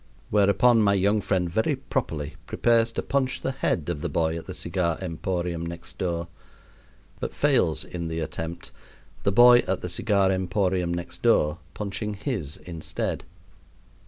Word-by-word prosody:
Whereupon 105 +3 +5
my 100 -1 +4
young 100 +2 +2
friend 95 -2 0
very 110 - +1
properly 80 - -3
prepares 115 -1 +2
to - - -2
punch 135 -1 0
the 135 - -1
head 95 - -1
of 85 -4 -2
the - - -2
boy 80 -1 0
at 85 - -7
the - - -6
cigar 85 -1 -1
emporium 85 -1 -3
next 85 +1 -8
door; 85 -2 -1 0.9
but - - -4
fails - - +2
in 85 -2 -5
the 80 0 -3
attempt, 80 +1 -5 0.5
the 100 - +1
boy 120 +4 +8
at 95 - 0
the 90 - -4
cigar 100 +1 +2
emporium 95 -1 0
next 85 0 -5
door 75 +2 +3 0.2
punching 105 +1 -3
his 100 - -3
instead. 85 -3 -4
95 Hz, 155 wpm, -26 LUFS, 85-105 Hz, 0.9 s, boy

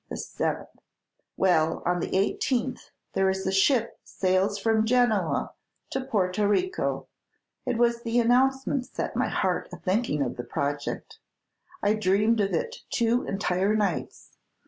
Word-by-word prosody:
The - - -5
seventh. - - -4 0.6
Well, 165 -4 +2
on 175 0 +1
the 185 - -1
eighteenth 245 +5 -1 0.2
there 195 0 +2
is 190 0 -2
a 190 - +1
ship 230 +5 +2
sails 190 +2 0
from 220 +1 +2
Genoa 220 - +1 0.4
for 265 - 0
Porto 210 -5 0
Rico. 365 - 0 0.6
It 235 - 0
was 235 0 +2
the 235 +1 +1
announcement 260 +2 +2
set - - -4
my - - +1
heart - - -1
a - - -7
thinking 185 - 0
of 125 -2 -4
the 120 - -4
project. 145 +2 -4 0.6
I 205 - +4
dreamed 215 +2 +2
of 195 - 0
it 475 0 -2
two 235 +1 +1
entire 195 +1 +1
nights. 200 -6 -2
210 Hz, 145 wpm, -27 LUFS, 185-240 Hz, 0.6 s, I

